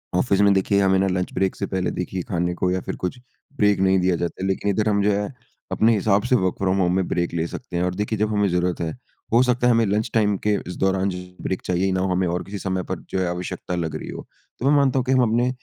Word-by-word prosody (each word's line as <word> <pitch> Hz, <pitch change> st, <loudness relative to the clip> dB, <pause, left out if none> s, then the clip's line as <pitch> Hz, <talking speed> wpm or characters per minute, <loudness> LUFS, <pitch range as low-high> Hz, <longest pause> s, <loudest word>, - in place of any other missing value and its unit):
Office 100 Hz, +1 st, +2 dB
में 100 Hz, -1 st, +5 dB
देखिए 100 Hz, +1 st, +2 dB
हमें 95 Hz, -1 st, +3 dB
ना 95 Hz, -, +2 dB
लंच 90 Hz, -1 st, -1 dB
ब्रेक 95 Hz, 0 st, 0 dB
से 100 Hz, -, -3 dB
पहले 95 Hz, -1 st, -1 dB
देखिए 90 Hz, +1 st, -3 dB
खाने 90 Hz, -1 st, 0 dB
को 90 Hz, -, 0 dB
या 95 Hz, -, 0 dB
फिर -, -, -5 dB
कुछ 90 Hz, +8 st, -2 dB, 0.4 s
ब्रेक 105 Hz, -4 st, +3 dB
नहीं 95 Hz, 0 st, +4 dB
दिया 90 Hz, 0 st, +2 dB
जाता 85 Hz, +1 st, -4 dB
है। 95 Hz, -, -1 dB
लेकिन 95 Hz, +1 st, 0 dB
इधर 105 Hz, +2 st, +1 dB
हम 100 Hz, -1 st, +2 dB
जो 105 Hz, -, +3 dB
है 105 Hz, +5 st, -2 dB, 0.4 s
अपने 115 Hz, +1 st, +3 dB
हिसाब 100 Hz, -1 st, +2 dB
से 130 Hz, -, +5 dB
वर्क 95 Hz, -6 st, +1 dB
फ्रॉम 95 Hz, 0 st, +1 dB
होम 90 Hz, -1 st, +2 dB
में 95 Hz, -1 st, 0 dB
ब्रेक 85 Hz, -1 st, -1 dB
ले 85 Hz, 0 st, -1 dB
सकते 95 Hz, -1 st, -6 dB
हैं। 85 Hz, -, +1 dB
और 90 Hz, 0 st, -1 dB
देखिए 105 Hz, +2 st, -2 dB
जब 105 Hz, 0 st, +1 dB
हमें 105 Hz, -1 st, +2 dB
ज़रूरत 90 Hz, 0 st, 0 dB
है, 80 Hz, -1 st, -1 dB, 0.4 s
हो 120 Hz, -, +6 dB
सकता 125 Hz, -1 st, +2 dB
है -, -, +5 dB
हमें 115 Hz, 0 st, +3 dB
लंच 105 Hz, +3 st, 0 dB
टाइम 105 Hz, -3 st, +2 dB
के 105 Hz, -, +3 dB
इस 90 Hz, -, -5 dB
दौरान 95 Hz, 0 st, +1 dB
ज 90 Hz, -1 st, -5 dB, 0.2 s
ब्रेक 95 Hz, -, -2 dB
चाहिए 90 Hz, +2 st, +1 dB
ना 95 Hz, 0 st, 0 dB
हो 95 Hz, 0 st, 0 dB
हमें 90 Hz, 0 st, +1 dB
और 90 Hz, +1 st, -2 dB
किसी 100 Hz, +1 st, -7 dB
समय 95 Hz, -1 st, -2 dB
पर 95 Hz, -2 st, -3 dB
जो 95 Hz, -, -1 dB
है 90 Hz, -, 0 dB
आवश्यकता 90 Hz, 0 st, -4 dB
लग 80 Hz, -3 st, -3 dB
रही -, -, -6 dB
हो। -, -, -7 dB, 0.3 s
तो 125 Hz, -, -3 dB
मैं 150 Hz, -, +5 dB
मानता 135 Hz, -2 st, +3 dB
हूँ 125 Hz, -, -2 dB
कि 130 Hz, -, 0 dB
हम 130 Hz, -1 st, +4 dB
अपने 120 Hz, +3 st, +2 dB
95 Hz, 285 wpm, -23 LUFS, 90-105 Hz, 0.4 s, हो